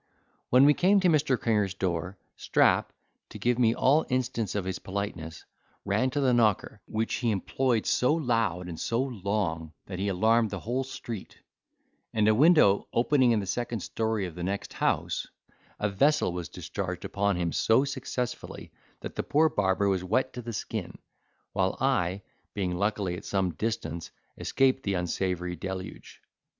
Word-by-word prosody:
When 130 +2 +6
we 145 - +7
came 195 +6 +4
to 185 - +4
Mr. 150 -5 +2
Cringer's 105 -4 +1
door, 90 0 -2 0.2
Strap, - - +2 0.4
to - - -9
give 120 0 +1
me 115 -1 +4
all 145 +4 +4
instance 125 -5 -1
of 100 -3 -1
his 95 -1 -3
politeness, 95 -5 -5 0.4
ran 130 - +1
to 140 - -2
the 130 -3 +3
knocker, 110 -3 +1
which 110 +1 -2
he 120 - +1
employed 115 +3 0
so 125 - +2
loud 115 - 0
and 85 -2 -7
so 115 - -1
long, 100 - -2
that 95 -2 -6
he 100 - -1
alarmed 110 +4 +3
the 100 -3 -5
whole 125 +4 -1
street; 115 -5 -8 0.8
and 110 -1 +3
a 110 - +6
window 140 - +5
opening 125 +1 +3
in 110 -2 +2
the - - -5
second 120 +2 -3
story 110 -1 -1
of 90 - -6
the 90 - -8
next 100 +3 -3
house, - - -1 0.5
a 105 - +1
vessel 135 +4 +2
was 90 -2 -5
discharged - - -5
upon 100 -1 0
him 85 -1 -1
so 115 +10 +3
successfully, 130 -2 -5 0.3
that - - -7
the - - -1
poor 155 +2 +3
barber 100 -4 +1
was 95 -2 +1
wet 115 +8 0
to 125 - -6
the 120 0 -6
skin, 100 - -5 0.6
while - - 0
I, 90 +3 0 0.3
being 95 -3 -1
luckily 100 -2 -1
at - - -10
some 95 -3 0
distance, 85 -3 -3 0.3
escaped 135 0 +1
the 100 -4 -1
unsavoury 90 0 -2
deluge. 95 +2 -7
105 Hz, 165 wpm, -28 LUFS, 95-125 Hz, 0.8 s, we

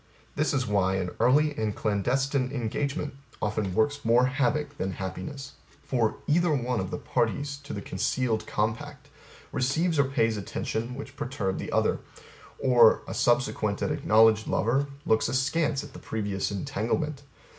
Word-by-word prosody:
This 150 -2 +1
is 130 -3 0
why 100 -3 +1
An 90 -2 -2
early 145 +4 +4
and 110 -4 -2
clandestine 130 +6 0
engagement 140 +4 -2 0.3
often 105 -3 -1
works 145 +6 +1
more 120 +2 +4
havoc 140 +3 0
than 95 0 -2
happiness. 95 +10 -6 0.3
For 115 -4 0
Either, 170 +2 +3
one 125 -3 -1
of 95 -1 -3
the - - -3
parties 140 +4 -1
to 140 +1 -11
the 100 - -5
concealed 110 +4 -1
compact 110 +2 -3 0.4
receives 155 +5 +1
or 140 - +5
pays 115 -5 +1
attention 110 +5 -3
which 135 0 -8
perturb 120 -9 -2
the - - -5
other; - - +2 0.6
or, 120 -4 +5
a - - -5
subsequent - - +1
and - - 0
acknowledged 110 0 +4
lover 135 +6 +1 0.2
looks 110 +1 +2
askance 140 +3 +1
at 145 -2 -11
the - - -9
previous 100 -3 -2
entanglement. 120 +9 -2
125 Hz, 150 wpm, -27 LUFS, 110-140 Hz, 0.6 s, or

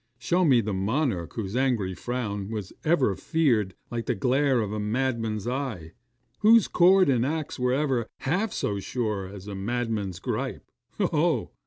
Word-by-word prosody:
Show 170 +9 +1
me 130 -6 +5
the 105 -1 -3
monarch 100 - -1
whose 105 -2 -4
angry 120 -8 +1
frown 105 -1 -4
was 105 -4 -5
ever 145 - +2
feared 115 - +1 0.2
like 115 -2 -3
the - - +1
glare 130 +4 +2
of 105 -2 -2
a 105 - -2
madman's 115 -1 -1
eye 120 - -3 0.5
whose 225 +1 +6
cord 185 +2 +5
and 125 -4 +3
axe 155 +1 -3
were 125 0 +1
ever 130 -5 0
half 185 +10 0
so 100 -1 -2
sure 105 -3 -2
as 100 0 -10
a 100 - -5
madman's 105 -2 -2
gripe. - - -4 0.3
Ho! - - +2
ho! - - +1
120 Hz, 165 wpm, -26 LUFS, 100-135 Hz, 0.5 s, whose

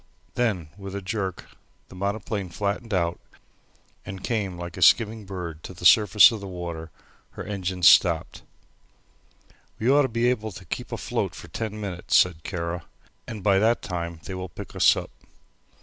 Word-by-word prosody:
Then 105 -11 -1
with 95 0 -7
a 100 - -4
jerk 95 -2 -3 0.4
the - - -13
monoplane 100 0 -3
flattened 100 +5 -3
out 85 -3 0 0.8
and 95 0 -8
came 100 -6 -2
like 85 -1 -7
a 90 - -7
skimming 110 +4 +4
bird 85 -5 -6
to 95 - -9
the 90 - -8
surface 105 +4 +7
of 110 - -4
the 100 - -7
water; 85 -3 -6 0.4
her - - -6
engines 95 -3 0
stopped. 85 -3 +4 1.4
"We 120 +4 +2
ought 145 +1 +6
to 140 - +2
be 115 +1 +1
able 110 -4 -2
to 95 - -11
keep - - -5
afloat - - -2
for - - -11
ten 110 -1 -4
minutes," 95 -4 -2
said 85 -3 +4
Kara, 85 -1 -4 0.4
"and 110 -4 -7
by 100 -2 +4
that 115 +3 +2
time 85 -2 -5
they 95 - -6
will 95 0 -5
pick - - -10
us - - +5
up." - - -6
95 Hz, 170 wpm, -25 LUFS, 90-105 Hz, 1.4 s, surface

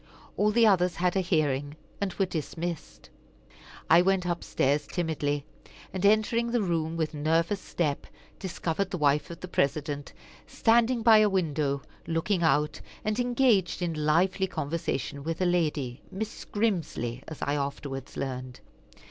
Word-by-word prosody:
All 210 - +3
the 230 +2 +4
others 180 -4 +3
had 180 +1 +1
a - - +3
hearing, 145 -5 0 0.3
and 200 -2 0
were 195 - +2
dismissed. 170 0 -5 0.8
I 165 +2 +7
went 190 0 +2
up 175 -1 -2
stairs 145 +3 +1
timidly, 145 -4 -1 0.5
and 190 0 -3
entering 215 +3 +3
the 240 -1 +1
room 165 -2 -1
with 160 -1 -1
nervous 165 +6 +1
step, 150 -5 -2 0.3
discovered 185 0 -2
the 190 - -3
wife 150 -1 +2
of 170 - -9
the 185 - -5
President 145 -2 -1 0.4
standing 235 +1 +3
by 220 -2 +8
a 215 -1 +5
window, 150 -7 0 0.2
looking 170 +3 0
out, 150 -2 +2 0.2
and 215 +2 0
engaged 240 -8 +2
in 170 -2 -1
lively 170 +5 +2
conversation 150 -3 -3
with 165 +1 -3
a 185 - +2
lady, 150 -8 0
Mrs. 220 +3 -6
Grimsly, 160 - -1
as 155 - -8
I 145 - 0
afterwards 140 -2 -4
learned. 130 -1 -4
170 Hz, 150 wpm, -28 LUFS, 145-195 Hz, 0.8 s, by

